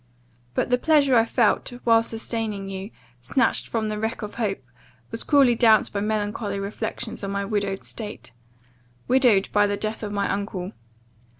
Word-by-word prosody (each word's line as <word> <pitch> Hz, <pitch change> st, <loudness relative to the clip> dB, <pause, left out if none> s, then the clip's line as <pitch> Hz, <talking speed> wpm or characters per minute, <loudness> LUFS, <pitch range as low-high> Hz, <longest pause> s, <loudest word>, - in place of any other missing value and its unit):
But -, -, 0 dB
the 250 Hz, -, +3 dB
pleasure 285 Hz, -3 st, +4 dB
I 225 Hz, -1 st, +5 dB
felt, 230 Hz, 0 st, +1 dB
while 230 Hz, -1 st, +5 dB
sustaining 225 Hz, -3 st, -4 dB
you, 195 Hz, +1 st, -6 dB, 0.3 s
snatched 230 Hz, -, +1 dB
from 220 Hz, -2 st, -1 dB
the 210 Hz, 0 st, -3 dB
wreck 220 Hz, +2 st, -3 dB
of 210 Hz, -, -6 dB
hope, 205 Hz, -, -2 dB, 0.5 s
was 225 Hz, -, -4 dB
cruelly 275 Hz, -5 st, +4 dB
damped 225 Hz, -2 st, +4 dB
by 200 Hz, -, -1 dB
melancholy 210 Hz, -1 st, -2 dB
reflections 200 Hz, +1 st, -5 dB
on 195 Hz, -, -2 dB
my 200 Hz, 0 st, -2 dB
widowed 200 Hz, -1 st, -2 dB
state 210 Hz, -, -5 dB, 0.8 s
widowed 245 Hz, -6 st, +4 dB
by 205 Hz, 0 st, +4 dB
the 205 Hz, 0 st, -1 dB
death 215 Hz, +1 st, -3 dB
of 210 Hz, -2 st, -4 dB
my 200 Hz, -1 st, 0 dB
uncle. 195 Hz, -2 st, -3 dB
215 Hz, 165 wpm, -24 LUFS, 200-230 Hz, 0.8 s, I